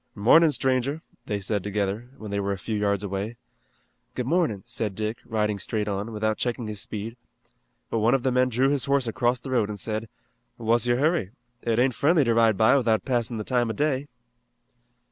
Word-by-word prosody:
"Mornin' 150 +10 +6
stranger," 135 +3 0 0.2
they 105 - -1
said 100 0 -2
together, 105 +3 -2
when 110 -4 -8
they 100 - -1
were 100 0 -1
a - - -4
few 110 +3 -4
yards 100 -1 0
away. 100 +4 -4 0.8
"Good 125 - -2
morning," 150 - +1
said 115 -4 -3
Dick, 110 +3 -2
riding 105 -2 -1
straight 105 +3 -1
on, 100 +2 -3
without 110 0 -1
checking 120 -1 -2
his 105 -2 -4
speed. 110 +2 -6 0.8
But 115 - +1
one 115 +4 +4
of 130 - -1
the 130 - +2
men 125 0 +3
drew 130 +3 +2
his 140 -3 0
horse 140 -2 +2
across 120 +2 0
the 130 - -8
road 115 -5 +2
and 105 -1 -4
said: 110 +2 -3 0.5
"What's 115 +1 +1
your 120 0 +3
hurry? 150 - +1 0.3
It 115 -1 0
ain't 130 +1 +3
friendly 150 +5 +3
to 115 -2 +2
ride 115 -3 +4
by 110 +4 +5
without 115 -4 +1
passin' 120 -3 0
the 110 - -3
time 120 0 +1
o' - - -1
day." 145 +2 0
115 Hz, 200 wpm, -25 LUFS, 105-130 Hz, 0.8 s, Mornin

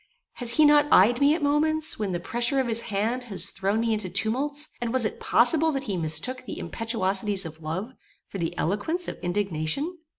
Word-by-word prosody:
Has 240 -2 +4
he 310 - +4
not 295 0 +5
eyed 235 +7 +5
me 285 +2 +4
at 330 - -4
moments, 310 +1 +2
when 205 -3 -2
the 175 - -2
pressure 240 +8 0
of 260 - 0
his 230 0 +2
hand 225 +5 -2
has 200 -6 0
thrown 195 +3 -1
me 230 -1 0
into 210 -4 -1
tumults, 275 - 0
and 235 -1 -2
was 255 -2 +1
it - - -4
possible 315 +7 +3
that 270 -1 -3
he 210 -7 -3
mistook 165 +10 -2
the - - -6
impetuosities 200 -3 -2
of 160 0 -10
love, 175 +10 -5 0.4
for 195 - -7
the 170 +1 -3
eloquence 265 - -2
of - - -6
indignation? 195 - -2
230 Hz, 200 wpm, -25 LUFS, 195-280 Hz, 0.4 s, not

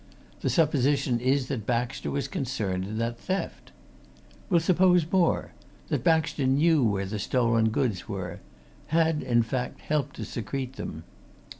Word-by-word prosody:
The - - -1
supposition 140 -5 +2
is 130 +2 +1
that 110 -6 -3
Baxter 125 +2 -1
was 140 0 -2
concerned 105 -9 -2
in 105 +2 -5
that 115 +1 -2
theft. 190 +9 -4 0.8
We'll 175 -4 +4
suppose 180 0 +4
more 185 -3 +2 0.4
that - - -1
Baxter 160 -5 +2
knew 150 +2 +4
where 100 -4 +1
the 105 +2 -4
stolen 115 0 +2
goods 110 -3 -1
were; 90 -4 -5 0.5
had, 160 -1 +2
in 120 -2 +2
fact, 125 +2 -4
helped 150 -3 -1
to 110 - -5
secrete 125 +4 -4
them. 80 -10 -6
130 Hz, 145 wpm, -27 LUFS, 115-155 Hz, 0.8 s, We'll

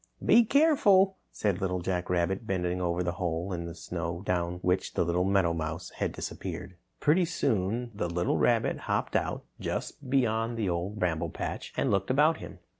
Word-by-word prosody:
"Be 235 - +7
careful," 205 -9 +4
said 100 -2 -1
Little 90 -1 0
Jack 90 0 -2
Rabbit, 90 +5 0
bending 90 -1 -1
over 90 0 0
the 85 - 0
hole 90 +2 -1
in 85 -1 -3
the 85 0 -7
snow 85 +1 -4
down 90 -2 0
which 90 +1 0
the - - +3
little 85 +2 +1
meadowmouse 85 -3 0
had - - -1
disappeared. 95 - -6 0.2
Pretty 160 +5 +4
soon, 115 - -1
the 90 -4 -2
little 85 +1 0
rabbit - - +2
hopped - - 0
out - - -1
just 135 - -4
beyond 115 -3 +1
the 110 -3 0
Old 90 +4 -2
Bramble 85 -4 0
Patch - - -5
and - - +1
looked 100 +2 +1
about 150 +5 +4
him. - - -9
90 Hz, 175 wpm, -29 LUFS, 85-115 Hz, 0.2 s, Be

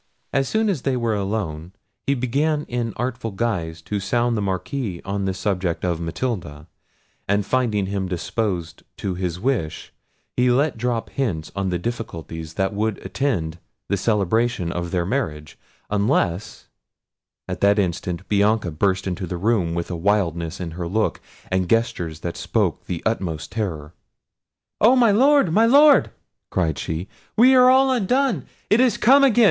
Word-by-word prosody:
As 135 -1 +1
soon 220 0 +1
as 185 -10 0
they 130 -1 0
were 115 -2 0
alone, 95 -5 -3 0.3
he 140 - +3
began 145 +5 0
in 120 -1 -2
artful 120 -1 -3
guise 90 -7 -3
to 105 +3 -3
sound 120 +4 0
the 105 - -1
Marquis 100 +1 -3
on 100 0 -2
the 95 - 0
subject 95 -3 -1
of 85 -2 0
Matilda; 85 - -4 0.6
and 100 0 +1
finding 115 -6 +1
him 95 -1 -2
disposed 90 -1 -3 0.2
to 95 - -2
his 90 -1 -3
wish, 105 - -2 0.4
he 125 0 +3
let 140 +4 +2
drop 120 -1 -2
hints 95 -13 -2
on 100 -1 -1
the 90 - 0
difficulties 85 -7 -6
that 95 +1 0
would 105 0 -1
attend 95 - -1 0.3
the 100 - +2
celebration 105 -1 +1
of 85 -1 -3
their 85 -1 0
marriage, 80 - -3 0.4
unless—At 105 -2 -3
that 100 +1 +4
instant 90 -1 -2
Bianca 105 -2 +2
burst 95 +4 0
into 90 -1 -3
the 90 - -4
room 95 -4 +1
with 85 +1 -3
a - - -2
wildness 85 -3 0
in 85 -3 -4
her 85 +1 -5
look 105 +5 0 0.3
and 95 -1 0
gestures 85 -9 0
that 85 - -4
spoke - - -1
the 85 -2 -4
utmost 90 -8 -2
terror. 85 -8 -4 0.9
"Oh! 235 +5 +6
my 240 -4 +5
Lord, 265 - +4
my 225 +4 +5
Lord!" 285 +3 +6 0.4
cried 80 -5 0
she; 80 +4 -3 0.3
"we 250 +4 +7
are 255 -1 +7
all 265 +1 +5
undone! 250 - +1 0.2
it 215 - +5
is 250 -4 +3
come 275 +5 +6
again! 245 -4 +4
100 Hz, 160 wpm, -22 LUFS, 85-125 Hz, 0.9 s, we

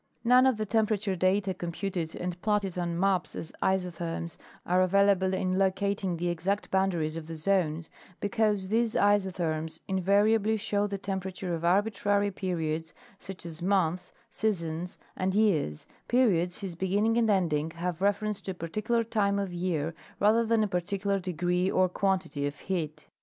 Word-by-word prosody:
None 250 +2 +6
of 260 -4 +2
the 215 - -1
temperature 215 -2 +1
data 190 +2 +1
computed 175 -1 -4
and 180 0 -4
platted 205 -4 0
on 170 -1 -2
maps 190 -1 +1
as 160 - -6
isotherms 170 -3 -1 0.3
are 185 +1 +3
ayailable 195 0 +3
in 185 0 0
locating 195 -1 0
the 175 +2 -2
exact 185 +5 -2
boundaries 175 -5 +1
of 165 -1 -6
the 165 - -6
zones, 165 -2 0 0.3
because 205 -2 0
these 230 +1 +1
isotherms 180 -6 +1
invariably 205 +3 +3
show 205 -1 0
the 200 -1 -3
temperature 190 -2 -4
of 165 0 -3
arbitrary 205 +2 +2
periods, 165 -4 -3 0.2
such 190 -2 -9
as 165 0 -7
months, 180 -2 +1 0.2
seasons 175 -5 -2 0.2
and 190 0 -1
years—periods 180 - +1
whose 190 -3 -4
beginning 200 +6 +1
and 225 -2 +2
ending 165 -6 +1
have 170 +1 -4
reference 205 +1 0
to - - -8
a - - -17
particular 215 +8 -1
time 205 -3 +1
of 195 -3 -2
year 170 -3 -1 0.3
rather 220 +3 +4
than 225 -1 +2
a - - +1
particular 195 +2 -1
degree 180 0 0
or 185 -1 +3
quantity 180 -6 -1
of 145 - -6
heat. 155 -5 -4
190 Hz, 150 wpm, -29 LUFS, 170-205 Hz, 0.3 s, None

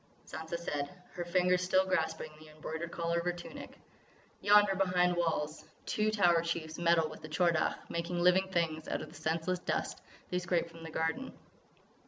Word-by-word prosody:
Sansa 160 +2 -5
said, 145 -4 -3 0.2
her 175 - -4
fingers 180 +1 +2
still 185 +1 +3
grasping 160 -4 -1
the 155 0 -13
embroidered 160 +2 -5
collar 170 0 0
of - - -3
her 175 - +2
tunic: 175 0 -9 0.6
"Yonder, 205 -1 +6
behind 180 -2 +2
walls, 160 -3 -1 0.2
two 215 0 +1
Tower 175 -6 +4
Chiefs 165 -1 -3
meddle 170 -2 +4
with 155 - -10
the 155 - -8
Tchor 170 +2 +3
Dagh, 155 - +1
making 170 +1 -3
living 180 +2 +4
things 165 -4 -1
out - - -2
of - - -9
the - - -13
senseless 165 +3 0
dust - - -2 0.3
they 180 - +1
scrape 175 -1 0
from 165 0 -12
the 165 - -7
garden." 160 +12 -2
170 Hz, 180 wpm, -32 LUFS, 160-180 Hz, 0.6 s, Yonder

